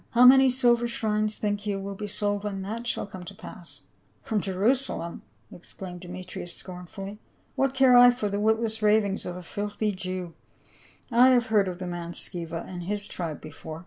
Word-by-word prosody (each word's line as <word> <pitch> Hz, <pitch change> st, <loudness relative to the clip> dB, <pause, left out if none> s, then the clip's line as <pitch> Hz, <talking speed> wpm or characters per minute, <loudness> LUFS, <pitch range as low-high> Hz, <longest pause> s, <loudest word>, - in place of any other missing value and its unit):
How 245 Hz, +1 st, +7 dB
many 265 Hz, +1 st, +8 dB
silver 240 Hz, -2 st, +3 dB
shrines 215 Hz, -2 st, -1 dB
think 205 Hz, 0 st, -2 dB
you 200 Hz, -1 st, -1 dB
will 200 Hz, +1 st, -5 dB
be 210 Hz, +2 st, -6 dB
sold 205 Hz, 0 st, -1 dB
when 195 Hz, -2 st, -3 dB
that 230 Hz, +4 st, -5 dB
shall -, -, -1 dB
come 195 Hz, -3 st, -9 dB
to 195 Hz, +3 st, -10 dB
pass 180 Hz, -3 st, -9 dB
?" -, -, -39 dB
" -, -, -38 dB
From 215 Hz, -2 st, -1 dB
Jerusalem 195 Hz, -1 st, 0 dB, 0.2 s
!" 110 Hz, +2 st, -38 dB
exclaimed 180 Hz, +1 st, -9 dB
Demetrius 180 Hz, -1 st, -7 dB
scorn 180 Hz, -1 st, -8 dB
fully, 195 Hz, +3 st, -8 dB, 0.2 s
" -, -, -38 dB
What 270 Hz, -1 st, +1 dB
care 260 Hz, -2 st, +6 dB
I 245 Hz, 0 st, +9 dB
for 245 Hz, -3 st, -1 dB
the 200 Hz, 0 st, -2 dB
witless 220 Hz, +1 st, +1 dB
ravings 210 Hz, -2 st, +2 dB
of 175 Hz, -, -5 dB
a 180 Hz, -, -8 dB
filthy 205 Hz, +4 st, -2 dB
Jew; 185 Hz, -2 st, -5 dB, 0.8 s
I 245 Hz, +2 st, +7 dB
have 245 Hz, -2 st, +4 dB
heard 205 Hz, -3 st, +4 dB
of 180 Hz, -1 st, -4 dB
the 185 Hz, -, -6 dB
man 175 Hz, -1 st, -5 dB
Sceva* 170 Hz, -2 st, -3 dB
and 175 Hz, -2 st, -7 dB
his 205 Hz, +1 st, 0 dB
tribe 165 Hz, -4 st, -5 dB
before." 155 Hz, +1 st, -9 dB
205 Hz, 205 wpm, -27 LUFS, 180-220 Hz, 0.8 s, I